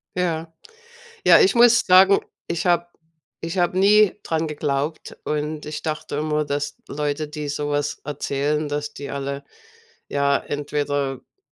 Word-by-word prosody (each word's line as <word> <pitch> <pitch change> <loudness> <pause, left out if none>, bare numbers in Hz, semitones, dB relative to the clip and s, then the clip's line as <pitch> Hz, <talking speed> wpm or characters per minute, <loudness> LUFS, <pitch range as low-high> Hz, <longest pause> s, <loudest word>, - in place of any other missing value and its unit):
Ja. 165 -2 -2 0.7
Ja - - +8
ich 390 - +4
muss 240 0 +6
sagen, 190 +2 +6 0.3
ich 170 +2 -2
habe 175 -1 +2 0.5
ich 165 +3 -4
habe 180 +1 +1
nie 210 +1 +5
daran 160 0 -1
geglaubt, 150 0 -3
und 150 0 -3
ich 150 0 -5
dachte 155 -2 -4
immer, 150 0 0
dass 145 0 -3
Leute, 150 +1 -2
die 150 -1 -5
so 145 +1 -3
etwas 145 0 -2
erzählen 150 +1 -2
dass 145 0 -4
die 140 - -7
alle, 140 0 -4 0.6
ja, 140 0 +2
entweder, 145 -1 -2
äh, 135 - -20
150 Hz, 145 wpm, -22 LUFS, 145-170 Hz, 0.7 s, Ja